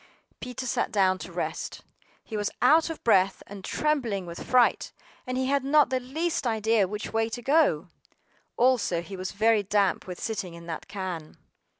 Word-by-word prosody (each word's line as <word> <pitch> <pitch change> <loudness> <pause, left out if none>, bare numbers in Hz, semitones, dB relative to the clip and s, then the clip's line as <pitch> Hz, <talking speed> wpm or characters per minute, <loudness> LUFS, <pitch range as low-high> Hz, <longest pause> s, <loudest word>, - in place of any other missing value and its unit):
PETER 250 +1 -6
sat 245 - -1
down 190 -2 +2
to - - -8
rest; - - -4 0.4
he 220 - -7
was 205 -1 0
out 315 +6 +5
of 325 - -7
breath 195 -4 +3
and 200 -1 -10
trembling 245 -12 -1
with 170 0 -8
fright, 250 -1 +3 0.4
and 255 0 -2
he 260 - 0
had 280 0 +1
not 285 0 +4
the 260 - +1
least 295 +3 -2
idea 220 -2 +2
which 210 +2 -5
way 225 0 +1
to 245 +2 -5
go. 310 +6 +3 0.7
Also 235 -9 +2
he 195 - -8
was 185 0 -4
very 220 +1 +3
damp 200 -1 +1
with 180 -1 -7
sitting 190 -6 -4
in 170 0 -11
that 165 -1 -6
can. 185 -6 -6
220 Hz, 180 wpm, -27 LUFS, 190-255 Hz, 0.7 s, out